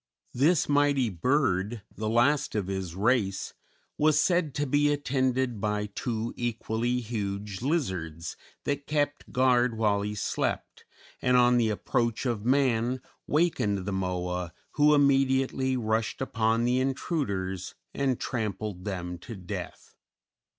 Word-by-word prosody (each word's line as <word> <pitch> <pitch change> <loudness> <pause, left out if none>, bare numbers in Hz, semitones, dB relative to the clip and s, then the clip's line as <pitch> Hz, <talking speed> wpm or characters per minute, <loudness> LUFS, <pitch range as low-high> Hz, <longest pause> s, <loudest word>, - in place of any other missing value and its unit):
This 150 +5 +3
mighty 145 -4 +3
bird, 105 - 0
the 110 0 -2
last 120 +6 +2
of 105 -3 0
his 95 -3 -4
race, 100 -2 +1 0.5
was 150 0 +4
said 170 -4 +2
to 145 - 0
be 145 +2 +3
attended 130 -5 0
by 105 0 0
two 115 0 -3
equally 120 +1 -1
huge 105 -3 -4
lizards 90 - -2 0.3
that 145 0 -2
kept 145 -1 -1
guard 125 -2 +3
while 105 -2 +2
he 105 +1 -3
slept, 100 - -2 0.4
and 125 0 +4
on 125 0 +5
the 115 -2 +3
approach 115 +3 -1
of 115 -5 -1
man 125 -1 +2 0.3
wakened 105 - +1
the 100 - -2
Moa, 90 -2 -2 0.2
who 150 0 +5
immediately 135 -2 +2
rushed 110 -1 -1
upon 115 -3 +1
the 125 +1 +2
intruders 100 - -2 0.2
and 135 -3 0
trampled 105 -5 -3
them 90 -3 -4
to 115 - -8
death. 90 -3 -7
120 Hz, 130 wpm, -28 LUFS, 100-135 Hz, 0.5 s, on